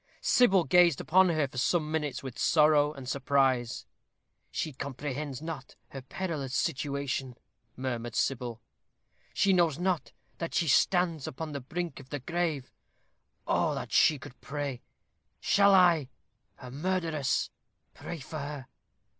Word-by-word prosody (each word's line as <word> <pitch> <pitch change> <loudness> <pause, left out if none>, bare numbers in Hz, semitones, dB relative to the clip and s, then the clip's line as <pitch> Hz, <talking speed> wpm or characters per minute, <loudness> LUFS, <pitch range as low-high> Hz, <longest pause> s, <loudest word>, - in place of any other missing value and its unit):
Sybil 195 -8 +4
gazed 175 -4 +4
upon 185 +3 +4
her 155 -4 +1
for 130 -1 -6
some 155 +3 +1
minutes 150 -4 -2
with 130 -3 -7
sorrow 150 -2 +4
and 135 -4 -10
surprise. 130 -3 +1 0.6
"She 155 - -3
comprehends 140 +1 -5
not 155 -5 -7
her 135 - -8
perilous 140 -2 -4
situation," 140 -2 -2 0.4
murmured 120 -3 -4
Sybil. 120 -3 -2 0.7
"She 195 - +3
knows 170 -5 +3
not 175 -9 -1 0.3
that 165 - -4
she 165 0 +2
stands 170 0 +2
upon 155 +4 -5
the 140 -1 -5
brink 170 +6 -4
of 135 -1 -14
the 145 - -3
grave. 160 -2 -2 0.7
Oh! - - +1
would - - -2
that - - -6
she 155 - +5
could 125 -1 -13
pray. 140 -3 -4 0.6
Shall 200 0 +4
I, 170 -7 +4 0.5
her 125 -1 -11
murderess, 160 -2 -1 0.4
pray 170 - -7
for 155 +3 -6
her? 140 -2 -6
145 Hz, 140 wpm, -29 LUFS, 130-170 Hz, 0.7 s, she